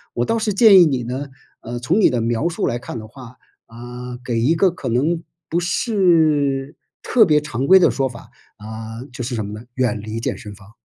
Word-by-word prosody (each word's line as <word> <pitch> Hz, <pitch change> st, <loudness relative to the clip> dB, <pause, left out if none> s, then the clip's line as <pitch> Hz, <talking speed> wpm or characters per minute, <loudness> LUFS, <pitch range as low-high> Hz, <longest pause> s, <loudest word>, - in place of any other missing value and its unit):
我 120 Hz, -, 0 dB
倒 230 Hz, -, 0 dB
是 215 Hz, -2 st, -1 dB
建 195 Hz, -2 st, +7 dB
议 -, -, +7 dB
你 135 Hz, -6 st, -1 dB
呢， 130 Hz, +4 st, -5 dB, 0.3 s
呃， 120 Hz, +1 st, -6 dB
从 165 Hz, -, +1 dB
你 -, -, +5 dB
的 125 Hz, -, -1 dB
描 115 Hz, +8 st, 0 dB
述 170 Hz, -, -3 dB
来 120 Hz, -, -1 dB
看 125 Hz, -, -7 dB
的 110 Hz, -, -10 dB
话， 125 Hz, +1 st, -13 dB, 0.3 s
啊， 120 Hz, +2 st, -9 dB
给 120 Hz, -2 st, -1 dB
一 135 Hz, +8 st, +3 dB
个 190 Hz, +3 st, +3 dB
可 180 Hz, -, -6 dB
能 155 Hz, +8 st, 0 dB, 0.3 s
不 170 Hz, -, 0 dB
是 160 Hz, -, +1 dB, 0.3 s
特 230 Hz, -4 st, +4 dB
别 150 Hz, -4 st, +3 dB
常 140 Hz, -3 st, -4 dB
规 190 Hz, 0 st, +8 dB
的 180 Hz, -, +4 dB
说 135 Hz, -1 st, -1 dB
法， 120 Hz, -, -12 dB, 0.3 s
啊， 110 Hz, +2 st, -8 dB
就 125 Hz, -, -5 dB
是 120 Hz, +1 st, -4 dB
什 110 Hz, -2 st, -3 dB
么 100 Hz, -, -7 dB
呢？ 110 Hz, +3 st, -9 dB
远 120 Hz, -4 st, -1 dB
离 110 Hz, +2 st, -5 dB
健 115 Hz, -, -3 dB
身 105 Hz, -4 st, -10 dB
房。 100 Hz, +1 st, -18 dB
125 Hz, 235 characters per minute, -20 LUFS, 115-165 Hz, 0.3 s, 规